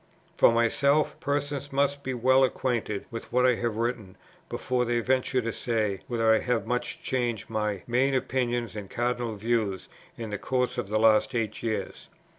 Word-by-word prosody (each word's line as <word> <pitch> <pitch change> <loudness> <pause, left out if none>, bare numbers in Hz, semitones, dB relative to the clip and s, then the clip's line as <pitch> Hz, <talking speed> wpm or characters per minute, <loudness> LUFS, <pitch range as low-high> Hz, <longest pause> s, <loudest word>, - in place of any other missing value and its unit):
"For - - +6
myself, 140 +6 +2
persons 145 0 -2
must 140 +1 +1
be 130 -2 -3
well 130 +2 +4
acquainted 120 -5 -1
with 115 - -7
what 125 +1 +3
I 125 - +5
have 120 -3 -1
written 115 -5 -3 0.3
before 125 -1 -1
they 120 0 +1
venture 130 +1 +1
to 115 0 -2
say 110 -5 -1
whether 115 -2 +3
I 110 - +4
have 125 -1 -1
much 125 0 -3
changed 120 -5 -2
my 105 -3 -1
main 130 +3 +2
opinions 120 -3 -1
and 100 -3 -6
cardinal 120 -2 -1
views 105 -3 -1 0.3
in 115 -2 -6
the 105 - -3
course 125 -1 -1
of 95 - -4
the 110 - +1
last 110 0 +4
eight 110 -2 -2
years. 110 -2 -3
120 Hz, 175 wpm, -27 LUFS, 110-130 Hz, 0.3 s, For